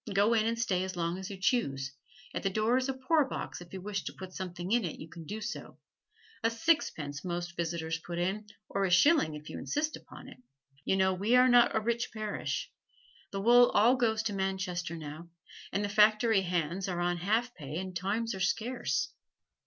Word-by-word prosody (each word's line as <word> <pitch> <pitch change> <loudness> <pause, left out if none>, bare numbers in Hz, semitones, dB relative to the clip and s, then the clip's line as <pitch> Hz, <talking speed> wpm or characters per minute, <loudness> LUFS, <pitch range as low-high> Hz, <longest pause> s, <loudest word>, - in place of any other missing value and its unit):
Go 205 +4 +4
in 220 -1 +3
and 230 0 0
stay 190 -6 0
as 190 0 -4
long 170 +1 -1
as 190 - -6
you 200 - -6
choose; 140 - 0 0.4
at - - -2
the 195 - +1
door 215 +5 +2
is 260 +1 +1
a - - +1
poorbox 270 - 0
and 175 - -10
if - - -21
you 190 - -6
wish 200 +1 -3
to - - -4
put 185 -1 -9
something 180 0 -5
in 240 0 +3
you 160 -2 -5
can 165 0 -10
do 215 +8 -5
so 215 0 -6 0.7
a 230 - +4
sixpence 230 - 0
most 175 -1 -4
visitors 165 -1 -2
put 170 +1 -6
in, 195 +5 -1 0.2
or 195 - -1
a 190 - +2
shilling 180 - +4
if 150 0 -10
you - - -6
insist 305 +1 -1
upon - - -12
it. - - -12 0.5
You - - +2
know 190 0 +3
we 205 +6 +2
are 250 +1 +7
not 245 -2 +5
a - - +4
rich 235 +2 -1
parish 215 -2 -3 0.6
the 195 - -4
wool 240 +3 +7
all 230 +5 +6
goes 225 -3 +1
to 210 - -2
Manchester 185 -3 -2
now, 155 +2 -8 0.4
and 205 +1 0
the - - -1
factory 215 +1 +4
hands 180 +1 -1
are 175 -1 -2
on 175 0 0
half 220 +7 0
pay 150 - -6
and 185 0 -5
times 210 +6 -1
are 190 - -6
scarce. 235 +6 0
195 Hz, 205 wpm, -31 LUFS, 175-230 Hz, 0.7 s, are